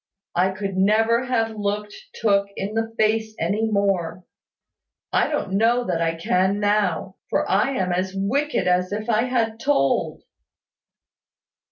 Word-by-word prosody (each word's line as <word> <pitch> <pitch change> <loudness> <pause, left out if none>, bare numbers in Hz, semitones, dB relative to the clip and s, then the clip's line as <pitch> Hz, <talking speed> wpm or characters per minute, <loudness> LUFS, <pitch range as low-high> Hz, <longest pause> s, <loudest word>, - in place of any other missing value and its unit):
I 180 +2 +2
could 190 0 -4
never 225 +5 +3
have 225 -3 0
looked 205 0 -3 0.3
Tooke 200 -3 +2
in 200 +2 -4
the 225 0 -1
face 220 0 +1
any 205 +7 0
more. 195 -4 0 0.9
I - - +3
don't - - -2
know 230 +5 +2
that 175 -6 -2
I 165 0 0
can 185 +4 +1
now; 205 0 0
for - - 0
I 275 - +1
am 185 -1 0
as 185 +2 -2
wicked 260 +7 0
as 180 +1 +1
if 215 +3 -2
I 220 +2 +2
had 230 -3 -1
told." 250 - 0
205 Hz, 145 wpm, -23 LUFS, 190-225 Hz, 0.9 s, never